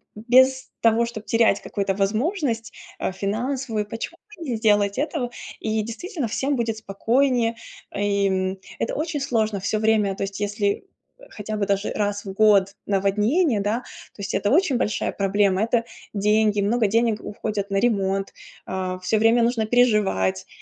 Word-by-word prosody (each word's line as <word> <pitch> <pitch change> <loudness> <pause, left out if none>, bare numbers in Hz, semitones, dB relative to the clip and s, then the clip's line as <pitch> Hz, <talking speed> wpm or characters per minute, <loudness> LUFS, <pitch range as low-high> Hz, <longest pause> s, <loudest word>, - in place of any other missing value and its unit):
без 260 +4 +3
того, 230 +1 +4
чтоб 220 -2 -7
терять 230 -3 +3
какую-то 195 -1 -2
возможность, 230 - -1 0.2
а, - - -2
финансовую, 220 +3 -2
почему 225 +10 -6 0.2
бы 335 - -6
не 235 - 0
сделать 205 -2 +2
этого? 285 -4 -1 0.3
И, 220 -1 -1
действительно, 260 - -4
всем 270 +6 -1
будет 230 -2 -1
спокойнее, 230 +3 +1 0.4
а, - - -5
и 200 -1 +2
м. 190 0 -1 0.2
Это - - -1
очень 310 0 -2
сложно 220 -7 0
всё 200 +3 -1
время, 215 -3 +2
то - - -3
есть, 195 0 -5
если 205 - -1 0.4
хотя 215 +1 -5
бы 200 -1 -1
даже 200 +1 0
раз 205 -1 -2
в 195 - -5
год 200 -2 +4
наводнение, 210 - +2
да, 210 +4 0
то 210 - -13
есть 200 - -4
это 205 - +1
очень 310 -3 +3
большая 215 - -1
проблема. 200 0 +1
Это 230 +1 +1 0.3
деньги. 210 0 +2
Много 220 +2 +2
денег 225 0 +1
уходит 205 -1 -4
на 200 - -2
ремонт. 195 -3 0 0.3
А, 185 -1 -3
всё 215 +3 +1
время 230 +2 +4
нужно 230 -2 +1
переживать, 210 - +2
215 Hz, 160 wpm, -23 LUFS, 200-235 Hz, 0.4 s, того